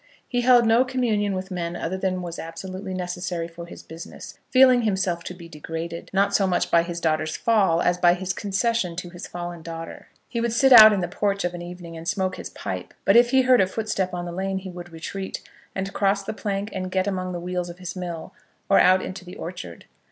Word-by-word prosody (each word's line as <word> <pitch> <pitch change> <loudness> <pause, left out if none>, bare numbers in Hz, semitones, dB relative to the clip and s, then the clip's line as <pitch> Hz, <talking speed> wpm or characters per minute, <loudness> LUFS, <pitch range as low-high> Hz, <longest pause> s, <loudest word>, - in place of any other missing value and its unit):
He 245 -1 0
held 245 -1 +6
no 225 +3 +5
communion 225 -6 0
with 190 +1 -5
men 175 -1 -3
other 175 +2 -3
than 185 -1 -2
was 170 -1 -6
absolutely 185 +3 -6
necessary 180 -1 -3
for 170 0 -10
his - - -11
business, 165 +1 -10
feeling 255 -1 +6
himself 190 -5 0
to 180 - -6
be 170 -2 -11
degraded, 165 +1 -6
not 200 +1 +2
so 195 -1 +3
much 180 - 0
by 170 - +6
his 170 0 -5
daughter's 155 -1 0
fall 195 -7 +3
as 175 0 +1
by 175 0 +5
his 185 0 -3
concession 205 -2 -1
to 175 0 -6
his 175 0 -8
fallen 175 -1 -6
daughter. 165 0 -8 0.2
He 235 - -3
would 235 -1 0
sit 265 +2 +5
out 220 -2 +11
in 200 -3 0
the 175 - -1
porch 200 +2 -1
of 175 0 -1
an 175 - -6
evening, 175 -1 -9
and 165 +1 -8
smoke 190 -1 -1
his - - -7
pipe; - - -6
but - - +5
if 240 0 +7
he 265 +1 +4
heard 255 -3 +5
a 190 - +3
footstep 195 -2 -2
on 175 0 -4
the 175 - -5
lane 190 +2 -2
he 190 -1 -6
would 175 -1 -9
retreat, 190 +4 -6 0.3
and 195 0 -3
cross 200 0 +1
the 195 - -4
plank 205 0 -3
and 185 -1 -3
get 185 0 0
among 185 -2 -2
the 175 - -4
wheels 180 0 -3
of 175 - -9
his 180 -1 -7
mill, 175 -3 -6 0.4
or 195 - +6
out 185 0 +5
into 185 0 -6
the 180 0 -10
orchard. 125 - -8
185 Hz, 230 wpm, -24 LUFS, 175-200 Hz, 0.4 s, out